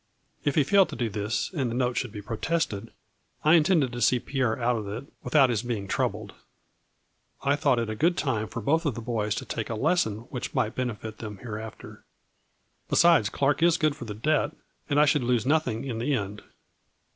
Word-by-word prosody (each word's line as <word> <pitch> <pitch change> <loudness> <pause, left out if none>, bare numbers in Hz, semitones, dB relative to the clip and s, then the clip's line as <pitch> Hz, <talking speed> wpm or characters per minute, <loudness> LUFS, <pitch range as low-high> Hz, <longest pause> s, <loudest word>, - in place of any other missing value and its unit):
If 145 - 0
he 150 - +5
failed 195 +6 +4
to - - -6
do 115 -1 -1
this, 105 - -2
and 135 -8 -1
the 115 - -3
note 125 -1 0
should 125 -2 -2
be 105 0 -8
protested, 115 -1 -2 0.5
I 155 - +5
intended 160 -5 +4
to 120 0 -5
see 125 - +4
Pierre 125 -3 -1
out 120 0 +1
of 105 -3 -4
it, 110 +7 -5 0.2
without 135 -5 +4
his 110 -3 0
being 115 -5 -3
troubled. - - -2 1.1
I 140 +1 +3
thought 135 -3 +2
it 115 -1 0
a 110 - -3
good 170 +8 +2
time 110 -7 -1
for 115 - -6
both 160 +6 +2
of 135 - -1
the 115 - -5
boys 110 -3 -1
to - - -4
take 110 - -4
a 115 - -2
lesson 110 - +1
which 125 - -5
might 110 +2 +1
benefit 110 -4 -4
them 105 -3 -7
here 110 -3 -5
after. 110 -1 -10 0.9
Besides, 170 -12 +5
Clark 140 +6 +1
is 170 0 +5
good 155 -2 +1
for 130 - -8
the 105 -2 -6
debt 150 +6 0 0.3
and 145 0 +3
I 150 - +7
should 145 -2 +2
lose 120 -2 +1
nothing 140 -5 +1
in 120 -4 -3
the 135 +4 +1
end. 100 -2 -4
125 Hz, 210 wpm, -27 LUFS, 110-145 Hz, 1.1 s, I